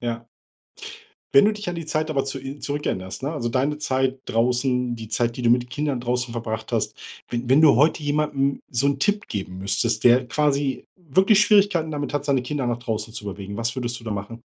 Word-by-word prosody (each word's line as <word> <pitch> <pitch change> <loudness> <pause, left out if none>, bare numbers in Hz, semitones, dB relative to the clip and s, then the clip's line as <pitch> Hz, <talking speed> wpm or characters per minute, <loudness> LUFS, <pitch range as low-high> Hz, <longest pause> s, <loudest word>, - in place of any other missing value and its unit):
Ja. 115 -1 -4 1.1
Ja. 140 - +10
Wenn - - +4
du 215 - +3
dich 210 -2 -6
an 175 - -2
die 165 -2 -6
Zeit 155 0 -1
aber 135 -3 0
zu 135 0 -4
in 135 +2 -8
zurückerinnerst, 130 -11 -3
ne, 140 +3 -2
also 135 -7 -2
deine 135 +5 0
Zeit 130 -2 0
draußen, 125 +1 +1
die 110 -1 -8
Zeit, 115 +2 0
die 125 - -5
du 120 - +3
mit 125 0 +2
Kindern 140 0 -2
draußen 125 0 -1
verbracht 110 -1 -4
hast, - - 0 0.4
wenn 120 0 -3
wenn 135 +4 +5
du 150 -6 +6
heute 150 +4 +3
jemandem 145 -2 0
so 125 +2 +1
'n 140 -1 +1
Tipp 205 +6 0
geben 95 -2 -5
müsstest, 100 +3 0
der 125 +1 +5
quasi 140 0 0
wirklich 190 +5 +3
Schwierigkeiten 200 -7 +4
damit 145 -1 -3
hat, 145 -1 -1
seine 140 -3 +1
Kinder 135 0 -3
nach 120 -1 -1
draußen 110 -2 -4
zu 105 - -6
bewegen, 100 0 -6
was 115 +1 -2
würdest 120 -1 -3
du - - -15
da 110 - -4
machen? 105 +3 -5
130 Hz, 220 wpm, -23 LUFS, 120-150 Hz, 1.1 s, Ja